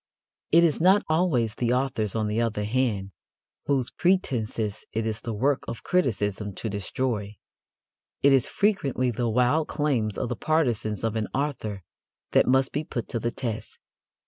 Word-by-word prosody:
It 170 +2 +6
is 165 -2 +2
not 190 +4 +5
always 155 -9 +2
the 120 +1 0
authors, 125 -6 -1
on 110 -1 0
the 105 +2 0
other 110 -3 -1
hand, 105 -4 0 0.6
whose 135 -4 +1
pretences 115 - 0
it 110 0 -1
is 110 -1 -3
the 115 - -4
work 130 +6 +1
of 115 - -6
criticism 105 - 0
to 115 - -4
destroy. 105 +1 -2 0.9
It 140 0 +6
is 130 -3 +3
frequently 140 - +1
the 120 +1 -1
wild 125 +7 +2
claims 130 -9 0
of 125 - -2
the - - -2
partisans 120 -10 0
of 115 -1 0
an 110 -1 -1
author 120 - -2 0.5
that - - +4
must 130 +1 +3
be 150 - -2
put 120 -6 -4
to 115 - -2
the 115 - -1
test. 115 -3 -5
120 Hz, 165 wpm, -26 LUFS, 110-140 Hz, 0.9 s, It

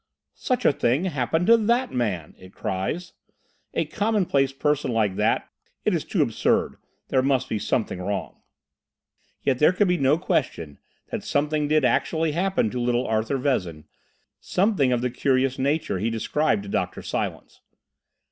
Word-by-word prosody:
"Such 255 - -1
a - - +5
thing 135 +7 +1
happened 160 0 0
to 230 - +7
that 235 +4 +1
man!" 100 -11 -2
it 95 0 -15
cries—"a 110 - -5
commonplace 200 - +1
person 150 -1 0
like 110 -4 +1
that! 105 +2 +1 0.4
It - - +2
is - - 0
too - - +1
absurd! - - 0 0.3
There 130 - +3
must 130 -1 +1
be 110 - -2
something 105 -3 -1
wrong!" 100 +1 -4 1.0
Yet 130 -2 +1
there 150 - +6
could 200 +2 +2
be 180 0 +2
no 140 +3 +3
question 85 - -2 0.3
that - - -3
something 150 +1 0
did 155 -2 +3
actually 160 +6 +1
happen 175 - 0
to 125 - -3
little 120 0 +1
Arthur 110 +5 0
Vezin, 90 - -1 0.6
something 185 - +1
of 120 -1 +1
the 125 0 -1
curious 130 +1 +1
nature 140 - 0
he 110 +4 0
described 115 -1 0
to 100 - -9
Dr. - - -2
Silence. - - -4
135 Hz, 155 wpm, -24 LUFS, 110-155 Hz, 1.0 s, to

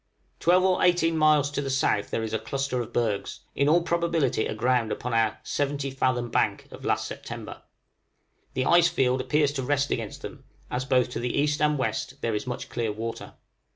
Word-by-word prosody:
Twelve 180 +2 +4
or 185 -1 +2
eighteen 175 -2 +3
miles 155 -2 +4
to 145 - -2
the 135 - -3
south 130 -6 +1
there 115 - -2
is 110 0 -4
a 110 - +1
cluster 130 +3 -2
of 120 - -7
bergs, 105 -4 -1
in 140 +2 +2
all 170 +2 +4
probability 170 -9 +1
aground 120 0 +1
upon 125 0 -3
our 115 -1 +2
"70 140 -1 -2
fathom 125 -2 0
bank" - - 0
of - - -11
last - - 0
September. - - -7 0.9
The 130 - 0
ice 170 0 +6
field 130 -6 +1
appears 150 0 +2
to 140 -2 -3
rest 140 +1 0
against - - -4
them, - - -8 0.3
as 125 +1 -2
both 130 -2 +2
to - - -3
the 125 0 -2
east 150 +1 +1
and 150 0 +3
west 130 0 -3
there 115 - -1
is 105 +3 -3
much 125 - -4
clear 115 -3 -2
water. 115 +2 -6
135 Hz, 195 wpm, -26 LUFS, 120-150 Hz, 0.9 s, ice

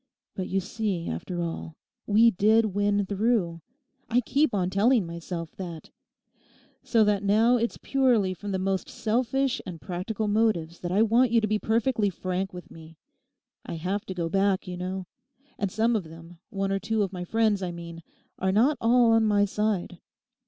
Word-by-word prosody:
But 185 - -4
you 195 - +1
see, 195 -3 -3
after 175 - -4
all, 165 -1 -5 0.3
we 225 +3 +5
did 215 +2 +3
win 205 0 +1
through; 195 -4 0 0.5
I 245 +1 +3
keep 280 +3 +1
on 185 -3 -1
telling 215 +2 +3
myself 170 0 -6
that. 170 -4 -7 0.9
So 225 -3 +3
that 205 -2 +2
now 220 +5 +4
it's 235 0 -2
purely 245 -8 +2
from 205 +2 -6
the 190 - 0
most 190 0 -2
selfish 250 +4 0
and 170 -3 -8
practical 200 +5 -3
motives 205 -6 +1
that 175 - -4
I 205 +4 +4
want 235 +3 +3
you 230 +1 +4
to 215 - 0
be 215 0 0
perfectly 220 -1 +1
frank 185 +1 -3
with 180 -1 -10
me. 160 0 -13 0.7
I - - -6
have 185 +5 -2
to 190 - -5
go 170 -2 -1
back, 195 +2 +1
you 180 - -5
know; 185 +1 -4 0.5
and 200 -2 -1
some 225 +3 +1
of 205 -6 -1
them, 165 +1 -13
one 195 0 -2
or 195 - 0
two 220 +1 0
of 195 -1 -4
my 180 -1 -4
friends 215 +1 +1
I 185 - -2
mean, 170 -1 -9 0.4
are 190 0 +1
not 250 +9 +3
all 235 0 +4
on 225 -1 +4
my 205 -1 +3
side. 205 -4 -2
200 Hz, 180 wpm, -26 LUFS, 180-225 Hz, 0.9 s, we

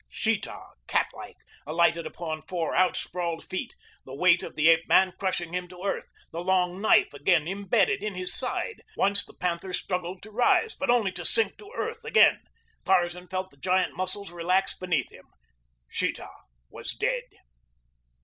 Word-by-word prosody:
Sheeta, - - -1 0.3
catlike, - - -2 0.3
alighted 170 +1 +2
upon 160 -2 -5
four 170 -2 -3
out 185 -1 +3
sprawled 170 -2 -4
feet, 185 - -4 0.3
the 135 - -9
weight 180 +3 +4
of - - -8
the 155 +1 +3
ape 165 0 +5
man 185 -1 +5
crushing 175 -3 -2
him 180 0 -2
to 180 +1 -12
earth, 200 - -2 0.2
the 170 - -4
long 185 0 +1
knife 215 - +4
again 155 +2 +2
imbedded 200 +1 +1
in 210 -2 -3
his 180 0 +3
side. 265 - -3 0.2
Once 200 +1 +2
the - - -17
panther 180 +1 -3
struggled 180 0 -3
to 215 - -11
rise; 250 - +3
but 280 - -4
only 235 -5 +3
to 180 -1 -7
sink 220 +3 +4
to 415 0 -13
earth - - -4
again. - - +5 0.4
Tarzan 180 -1 +1
felt 185 0 -4
the 140 - -22
giant 185 +5 +1
muscles 185 0 -3
relax 180 +3 +1
beneath 170 -8 -1
him. - - -16 0.6
Sheeta - - -3 0.4
was - - -6
dead. - - -1
180 Hz, 165 wpm, -27 LUFS, 170-195 Hz, 0.6 s, ape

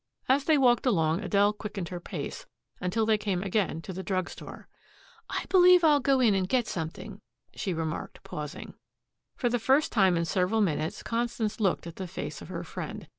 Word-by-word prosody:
As 275 +2 +3
they 315 -2 +4
walked 250 -2 +3
along 165 -7 +2
Adele 205 0 +2
quickened 205 -5 -6
her 180 - -5
pace, - - -6 0.3
until 215 +5 0
they 215 -1 +2
came 195 -3 -1
again 190 -5 -1
to 190 - -6
the 190 - -5
drug 185 -2 -2
store. - - -10 0.6
"I - - -3
believe 360 -1 +6
I'll 300 -3 +5
go 270 0 +2
in 235 -5 +4
and 190 -1 0
get 250 -3 +2
something," 160 -5 -6 0.3
she 195 - -3
remarked, 160 -2 -4
pausing. 150 -1 -7 0.6
For 245 - -1
the 240 0 +1
first 265 +6 +3
time 190 -5 +4
in 170 - 0
several 185 +6 +1
minutes 160 -6 -1
Constance 230 -2 -2
looked 190 -6 +1
at 170 -1 -9
the 190 - -5
face 180 - -6
of - - -9
her - - -5
friend. - - -7
205 Hz, 190 wpm, -28 LUFS, 180-240 Hz, 0.6 s, believe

